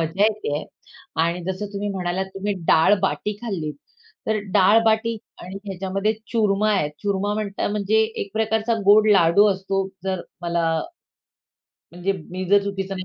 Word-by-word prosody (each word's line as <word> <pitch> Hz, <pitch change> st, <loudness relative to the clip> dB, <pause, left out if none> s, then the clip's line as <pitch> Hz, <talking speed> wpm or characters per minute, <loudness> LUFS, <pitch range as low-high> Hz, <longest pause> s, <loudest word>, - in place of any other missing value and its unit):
मजा 165 Hz, +5 st, 0 dB
येत 215 Hz, -8 st, 0 dB
आहे 150 Hz, -, -3 dB, 0.6 s
आणि 170 Hz, +1 st, -1 dB
जसं 200 Hz, +3 st, -5 dB
तुम्ही 205 Hz, +1 st, -3 dB
म्हणालात, 185 Hz, 0 st, -2 dB
तुम्ही 200 Hz, +2 st, -2 dB, 0.2 s
डाळ-बाटी 195 Hz, +4 st, +3 dB
खाल्लीत. 165 Hz, -10 st, -3 dB, 0.5 s
तर 220 Hz, 0 st, +1 dB
डाळ-बाटी 220 Hz, +3 st, +4 dB, 0.3 s
आणि 185 Hz, +2 st, -8 dB
ह्याच्यामध्ये 195 Hz, +2 st, -1 dB, 0.2 s
चूरमा 215 Hz, -2 st, +2 dB
आहेत, 150 Hz, -7 st, +1 dB
चूरमा 200 Hz, 0 st, 0 dB
म्हणता 205 Hz, -2 st, -2 dB
म्हणजे 210 Hz, +1 st, +2 dB, 0.2 s
एक 200 Hz, -, -9 dB
प्रकारचा 220 Hz, +1 st, 0 dB
गोड 210 Hz, +1 st, +7 dB
लाडू 190 Hz, +2 st, +5 dB
असतो 195 Hz, 0 st, -2 dB, 0.2 s
जर 190 Hz, -2 st, -1 dB, 0.2 s
मला 170 Hz, -1 st, 0 dB, 1.2 s
म्हणजे 180 Hz, +3 st, -1 dB, 0.2 s
मी 185 Hz, +1 st, -4 dB
जर 200 Hz, 0 st, +6 dB
चुकीचं 195 Hz, -1 st, -3 dB
नाही 185 Hz, -, -5 dB
195 Hz, 145 wpm, -22 LUFS, 185-210 Hz, 1.2 s, गोड